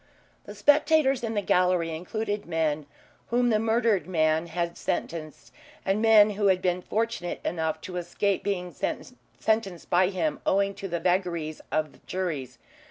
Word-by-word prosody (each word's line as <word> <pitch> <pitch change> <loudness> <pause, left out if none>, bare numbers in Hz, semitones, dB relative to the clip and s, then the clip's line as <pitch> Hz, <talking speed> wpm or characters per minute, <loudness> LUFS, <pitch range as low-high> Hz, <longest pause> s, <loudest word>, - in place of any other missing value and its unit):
The 205 - -9
spectators 290 +2 +3
in 225 -1 -2
the 205 - 0
gallery 180 -3 +2
included 205 +4 -3
men 155 -3 -1 0.4
whom 245 0 +2
the 215 - +3
murdered 225 -5 +1
man 160 -2 +1
had 170 0 -2
sentenced 155 -3 -4 0.3
and 195 +2 +1
men 215 -2 +6
who 205 0 +1
had 190 -1 +4
been 180 0 0
fortunate 220 -4 -2
enough 160 -2 -1
to 180 -1 -6
escape 180 +3 -1
being 180 -3 -2
sentenced 220 -7 -3
by 180 +1 +4
him 280 +11 -2
owing 200 +1 +2
to 195 0 -6
the 170 -2 -2
vagaries 175 -4 -1
of 155 -1 -2
juries. 165 -9 -3
185 Hz, 150 wpm, -27 LUFS, 170-215 Hz, 0.4 s, men